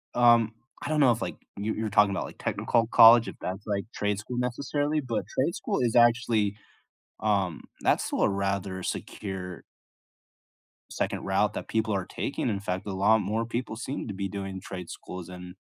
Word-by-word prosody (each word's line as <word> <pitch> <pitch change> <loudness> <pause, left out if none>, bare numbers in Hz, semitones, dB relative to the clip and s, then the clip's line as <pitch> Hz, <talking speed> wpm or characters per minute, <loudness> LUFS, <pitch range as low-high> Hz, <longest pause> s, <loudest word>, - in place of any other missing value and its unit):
um, 120 -2 +5 0.3
I 145 - -4
don't 155 - +1
know 135 -4 +6
if, 115 0 -1
like - - -3 0.2
you 105 +2 -1
you 110 - -3
were 110 - -1
talking 105 -1 +4
about, 95 - -2
like, - - -11
technical 115 -1 +1
college, 115 0 +8
if - - -6
that's, 95 +3 -5
like, 100 -1 -1
trade 105 -1 -1
school, 120 +4 -6
necessarily, 145 +4 -1
but 120 -4 -2
trade 155 +7 +2
school - - -2
is 120 -1 +1
actually, 115 -3 +4 0.7
um 100 -6 0 0.2
that's - - +2
still - - -1
a - - +5
rather 100 -1 -2
secure 90 -4 -5 1.3
second - - -2
route - - +1
that - - -5
people 110 -1 0
are 95 -2 -1
taking, - - -3
in 100 -3 -1
fact, 95 0 -3
a 100 - -3
lot 105 +4 +4
more 110 +4 -1
people 120 -1 -3
seem 130 +4 -4
to 100 - -4
be 95 0 -3
doing 95 -1 -5
trade 90 -2 -7
schools, 90 -1 -8
and 90 0 -9
105 Hz, 190 wpm, -27 LUFS, 95-120 Hz, 1.3 s, college